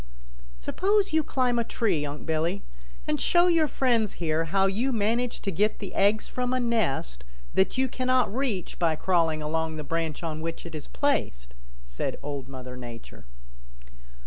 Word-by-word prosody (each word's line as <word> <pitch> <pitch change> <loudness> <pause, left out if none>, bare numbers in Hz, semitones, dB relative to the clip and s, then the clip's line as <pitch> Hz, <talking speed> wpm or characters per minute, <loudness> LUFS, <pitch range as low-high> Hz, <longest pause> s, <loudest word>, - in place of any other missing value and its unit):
"Suppose 395 - +1
you 315 - +4
climb 250 -4 +1
a - - +2
tree, 185 -11 0
Unc' 145 +1 -7
Billy, 165 +4 0 0.4
and 150 - 0
show 345 0 +4
your 335 -3 +4
friends 235 -6 +1
here 165 -1 0
how 195 +4 +2
you 220 +8 +1
manage 230 +2 0
to 195 - -2
get 210 +5 +1
the 200 - -7
eggs 205 +2 +3
from 250 0 -1
a - - +1
nest 170 - 0 0.3
that 190 +6 +2
you 260 0 +3
cannot 255 -3 +1
reach 245 -9 -2
by 165 -2 +2
crawling 165 -3 +1
along 160 +1 -1
the 155 - -4
branch 165 +1 -2
on 155 -1 -3
which 165 +1 -5
it 170 - -8
is 155 - -6
placed," - - -1 0.3
said - - -3
Old 140 -2 -5
Mother 130 -1 -7
Nature. 115 - -9
180 Hz, 170 wpm, -27 LUFS, 155-245 Hz, 0.4 s, you